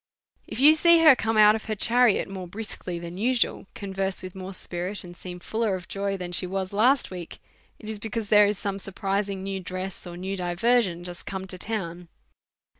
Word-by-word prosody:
If - - -6
you 295 +3 +8
see 335 +1 +6
her 310 -4 +9
come 225 -2 -1
out 210 0 +8
of 220 - -4
her 220 - -2
chariot 240 +1 +3
more 190 -2 -7
briskly 185 -2 -5
than 170 +2 -7
usual, 240 -3 +1
converse 195 -1 -2
with 185 -1 -7
more 190 0 -7
spirits, 185 +2 -4
and 175 -1 -11
seem 180 0 -8
ful 220 +5 -5
ler 220 -4 +1
of 180 -1 -8
joy 195 0 -2
than 180 -1 -6
she 180 +1 +1
was 190 +1 -3
last 245 +5 +3
week, 175 -2 -7 0.4
it 215 - -12
is 215 -1 -3
because 220 0 -4
there 210 -1 +7
is 205 -1 -1
some 200 0 -3
surprising 195 0 -2
new 195 0 -3
dress, 185 0 -5
or 175 0 -8
new 190 +2 -4
diversion 180 +1 +1
just 175 -1 -9
come 190 -1 -4
to 185 -1 -6
town. 180 -5 -3
195 Hz, 205 wpm, -26 LUFS, 185-215 Hz, 0.4 s, her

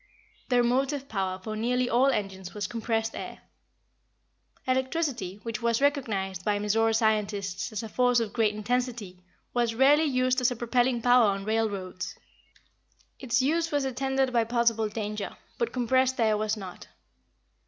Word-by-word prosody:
The 245 -1 +4
motive 270 +3 0
power 190 -4 -2
for 215 +3 -6
nearly 245 +3 0
all 245 +3 +3
engines 195 -7 -2
was 205 - -2
compressed 225 -1 -2
air. - - -7 1.3
Electricity, 260 - -1
which 225 -2 -4
was 235 -1 +1
recognized 215 - 0
by 205 +1 +1
Mizora 220 +2 +1
scientists 205 -3 0
as 215 0 -4
a - - -5
force 245 +2 +2
of 225 -3 -3
great 215 -3 +1
intensity, 225 -4 -2 0.3
was 235 -2 0
rarely 285 +5 +5
used 255 -2 +1
as 250 - +4
a 245 - -4
propelling 240 +1 +1
power 245 -2 +6
on 195 0 -3
railroads. 205 -4 -2 1.0
Its 255 0 +1
use 330 +4 +1
was 290 -2 0
attended 265 0 0
by 235 -1 +3
possible 230 -1 +1
danger, 210 -1 -5 0.2
but 470 - 0
compressed 260 +1 +1
air 220 -2 +3
was 215 +1 -1
not. 190 -3 -9
230 Hz, 150 wpm, -27 LUFS, 210-255 Hz, 1.3 s, power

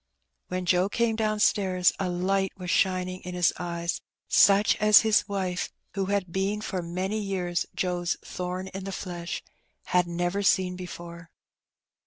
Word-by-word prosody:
When 185 0 -3
Joe 180 +2 +3
came 230 +1 +1
downstairs 210 -4 +2
a 190 -2 -1
light 190 +2 0
was 180 -1 -4
shining 185 -1 +1
in 180 0 -7
his 175 -1 +3
eyes, 170 -1 -3 0.3
such 200 +1 +5
as 210 0 +7
his 220 -2 +3
wife 185 -3 -2 0.2
(who 195 -1 -1
had 195 -2 -1
been 195 +2 0
for 190 -4 -3
many 185 +5 -2
years 185 -4 -2
Joe's 180 -2 -1
"thorn 180 +1 -4
in 195 0 -7
the 195 - -4
flesh") 175 -3 -5 0.4
had 180 -1 +2
never 175 +3 -1
seen 185 -2 +2
before. 170 -2 -9
185 Hz, 150 wpm, -27 LUFS, 180-195 Hz, 0.4 s, as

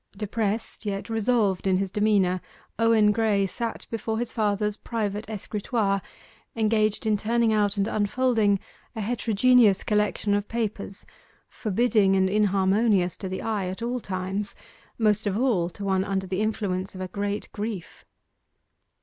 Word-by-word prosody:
Depressed, 215 +2 -2
yet 200 +1 -4
resolved 220 -4 +1
in 185 -1 +3
his 195 -1 -2
demeanour, 200 -4 +2 0.4
Owen 225 -2 +4
Graye 210 -3 +2
sat 230 +5 -4
before 225 0 -2
his 240 +1 -2
father's 210 -1 0
private 215 -2 -3
escritoire, 210 -1 -1 0.5
engaged 215 -1 +1
in 215 -1 +3
turning 230 +1 +1
out 205 -1 +1
and 200 +1 +1
unfolding 215 -1 +2 0.4
a 220 - -3
heterogeneous 230 -1 +3
collection 210 -1 +1
of 205 0 0
papers 215 -4 -4 0.4
forbidding 215 -2 +2
and 190 0 +2
inharmonious 200 -1 +2
to 190 - -5
the 185 - -4
eye 210 -4 -1
at 190 +5 -5
all 245 +1 -1
times 195 +1 -3 0.4
most 215 -2 +2
of 200 0 0
all 220 -9 +1
to 200 +3 -7
one 190 -1 +2
under 195 -1 -2
the 190 +1 -2
influence 195 -4 -2
of 185 - -6
a 185 - -3
great 200 +2 -3
grief. 210 -4 -6
210 Hz, 145 wpm, -26 LUFS, 195-225 Hz, 0.5 s, Owen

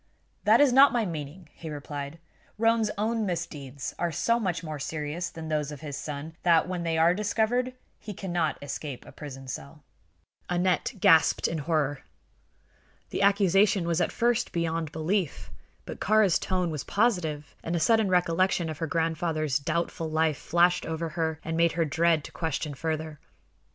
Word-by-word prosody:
"That 220 +2 +6
is 285 -3 +5
not 275 +2 +8
my 235 -2 +1
meaning," 160 0 -6
he 160 - -8
replied. 145 0 -6 0.4
"Roane's 225 0 +3
own 220 +2 0
misdeeds 145 -8 -4
are 175 -1 0
so 230 +9 +1
much 180 -6 -2
more 155 -2 -5
serious 155 +5 -3
than 160 -1 -8
those 150 -2 -1
of 145 - -9
his 145 -3 -5
son 150 +2 -6
that, 170 -1 +4
when 180 -1 -3
they 165 -1 -1
are 165 +2 +5
discovered, 220 +5 0 0.2
he 215 - -7
cannot 175 -5 -1
escape 145 -2 -6
a - - -12
prison 135 -3 -9
cell." 140 +3 -8 0.7
Aneth 180 +5 0
gasped 160 -2 +5
in 165 - -2
horror. 145 -2 0 1.1
The - - -2
accusation 200 -1 +4
was 170 0 +1
at - - +1
first 240 0 +1
beyond 165 -2 -2
belief; 160 - -2 0.3
but - - -7
Kāra's 210 -4 +3
tone 180 -3 -1
was 150 -3 -4
positive 170 -10 0
and 165 - -2
a - - +1
sudden 220 +4 +3
recollection 180 -1 +2
of 155 - -8
her 165 - -1
grandfather's 160 -2 0
doubtful 165 +2 -2
life 155 -2 +1
flashed 175 +1 +3
over 165 0 -3
her 160 -1 -2
and 165 - -3
made 170 0 +3
her 165 -1 +1
dread 165 +1 +2
to - - -9
question 160 -2 -3
further. 155 +1 -4
165 Hz, 165 wpm, -27 LUFS, 155-185 Hz, 1.1 s, not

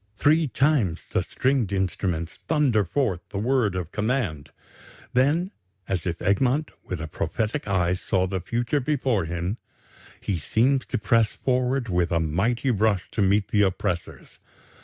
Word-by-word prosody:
Three 155 +5 +3
times 130 - +1
the - - +2
stringed 130 -6 0
instruments 90 -4 -2
thunder 140 -9 +3
forth 100 - 0
the - - -5
word 115 -2 +1
of 90 -2 -4
command. 105 - -1 0.6
Then, 150 +9 +2 0.4
as 90 -2 -2
if 85 -1 -2
Egmont 130 +10 +2
with 90 - -5
a 80 - -4
prophetic 110 - -2
eye 90 -3 +2
saw 95 0 0
the 95 0 -3
future 120 - -1
before 130 - 0
him, 85 +5 -3 0.6
he 100 - -2
seems 130 - +1
to - - -1
press 110 +1 +3
forward 125 0 0
with 90 -3 0
a 85 - +2
mighty 105 - 0
rush 105 -3 +1
to 110 - -1
meet 100 +1 +2
the 105 -3 +3
oppressors. 95 -2 -2
105 Hz, 150 wpm, -25 LUFS, 90-130 Hz, 0.6 s, Three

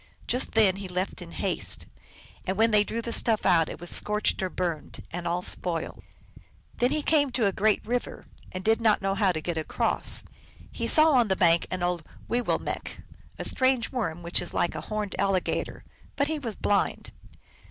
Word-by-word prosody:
Just 250 - -1
then 205 -4 +4
he 195 -1 -6
left 180 +1 -3
in - - -9
haste. - - -2 0.6
And 190 +1 -1
when 225 +1 +4
they 210 -1 +5
drew 230 +2 -4
the 235 - -3
stuff 225 -3 +1
out 165 -3 +4
it - - -8
was 175 +1 -6
scorched 210 -1 +2
or 185 - -1
burned, 175 -3 -4
and 175 0 -4
all 175 +1 -1
spoiled. 170 -3 -2 0.8
Then 245 - +3
he 300 +1 -1
came 290 -3 +3
to 240 -3 +2
a 200 - +3
great 210 +3 +1
river, 245 +2 -3 0.3
and 185 0 -6
did 225 +2 +2
not 215 -3 +3
know 195 0 +1
how 195 -1 +2
to 160 - -3
get 165 0 -2
across. 155 - +2 0.5
He - - -3
saw 315 0 +6
on 245 -5 +4
the 190 - +1
bank 170 -2 +3
an 185 -1 -3
old 175 -2 -1 0.2
Wi 245 - +1
willmelcq\ - - -3 0.3
a - - -4
strange 260 -2 +2
worm 175 -10 -3
which 170 +1 +1
is - - -2
like 175 - +1
a - - -5
horned 215 -2 -4
al 195 0 +2
ligator; 185 - -2 0.3
but 280 0 +1
he 315 0 -2
was 230 -7 -5
blind. 205 -1 0
200 Hz, 200 wpm, -27 LUFS, 180-235 Hz, 0.8 s, saw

